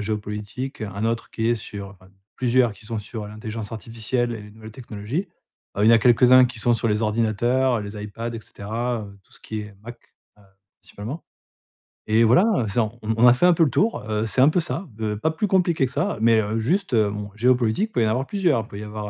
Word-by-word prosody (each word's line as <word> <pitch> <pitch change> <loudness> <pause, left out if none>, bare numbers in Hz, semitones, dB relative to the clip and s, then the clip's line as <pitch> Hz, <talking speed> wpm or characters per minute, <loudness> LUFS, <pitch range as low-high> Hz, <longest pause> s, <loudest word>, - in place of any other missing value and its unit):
géopolitique, 105 +5 -5
1 100 0 -4
autre 115 +1 -2
qui 115 0 -1
est 120 - +3
sur 100 -3 -8 0.4
plusieurs, 125 -2 +2
qui 105 +1 -15
sont 115 -1 -3
sur 105 +1 -7
l'intelligence 110 +1 -7
artificielle 115 +2 -2
et 110 - -6
les 105 - -12
nouvelles 110 +1 -12
technologies. 120 - -5 0.5
Heu, 105 - +2
il - - +5
y - - +8
en - - +8
a 115 - +6
quelques-uns 125 +2 +6
qui 120 -1 -8
sont 120 - +3
sur 115 +1 -1
les 105 +1 0
ordinateurs, 115 +3 +1
les 105 0 -7
iPad 115 +3 -6
et 115 - -5
cetera, 115 +3 -4
heu, 100 -1 -12
tout - - -28
ce - - -15
qui 110 -1 -5
est 105 -1 -10
Mac, 120 +2 -10 0.4
heu, 105 - -21 0.4
principalement. 120 +11 -8 0.9
Et 115 +1 +5
voilà, 130 - +4
c'est 100 - -1
on 115 +1 -1
on 110 - 0
on 120 +2 +6
a 120 - +8
fait 150 - +2
un 180 - +6
peu 165 - +3
le 155 - +3
tour, 205 - 0
heu, 110 +1 0
c'est 120 +3 +1
un 140 - +7
peu 175 - +1
ça. 160 +4 -3
Be 110 -1 -3
pas 160 +10 0
plus 205 +6 -1
compliqué 175 -7 +2
que 125 - -5
ça, - - -1
mais, 115 -1 +5
heu, 110 +2 -2
juste, 175 - 0
heu, 105 -2 +3
bon 105 0 -6
géopolitique, 125 - +2
peut - - 0
y - - +3
en - - +1
avoir 125 +5 0
plusieurs. 175 - +1
Il - - -17
peut 100 - -9
y - - -6
avoir, 105 0 -6
heu, - - -5
115 Hz, 245 wpm, -23 LUFS, 105-125 Hz, 0.9 s, y